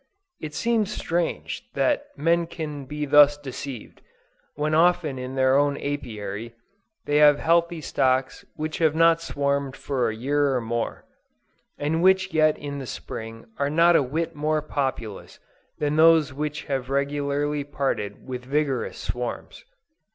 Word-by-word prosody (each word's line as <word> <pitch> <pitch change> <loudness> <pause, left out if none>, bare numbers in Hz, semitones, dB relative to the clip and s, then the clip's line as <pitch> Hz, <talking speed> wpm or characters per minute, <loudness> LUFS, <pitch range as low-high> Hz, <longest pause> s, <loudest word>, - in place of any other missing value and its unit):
It 150 -1 -7
seems 225 -3 +1
strange 175 -5 -2
that 290 -1 +1
men 170 +2 +2
can 150 -4 -6
be 150 +2 -4
thus 145 0 +6
deceived, 135 -3 -8 0.5
when 150 +1 -1
often 160 -4 +3
in 130 +1 -6
their 130 0 +3
own 145 0 +2
Apiary, 115 -5 -5 0.5
they 145 - +1
have 150 -1 +7
healthy 170 +1 +1
stocks 130 -1 0
which 155 0 -4
have 160 -2 +3
not 165 0 +4
swarmed 140 -3 -1
for 130 -5 -1
a 110 - -4
year 140 +3 +1
or - - +1
more, 115 0 -3 0.7
and 155 +3 -1
which 190 +1 +3
yet 155 -1 +3
in 140 -1 -6
the 135 - -7
spring 115 0 -7
are 140 0 +1
not 170 +3 +4
a - - +5
whit 155 +6 -2
more 155 0 0
populous 130 -8 -4 0.4
than 150 0 -1
those 160 -3 +5
which 150 +2 -4
have 135 -2 -3
regularly 145 +1 -1
parted 135 -7 -3
with 125 -1 -6
vigorous 135 -1 -1
swarms. 125 -1 -5
145 Hz, 145 wpm, -24 LUFS, 130-155 Hz, 0.7 s, have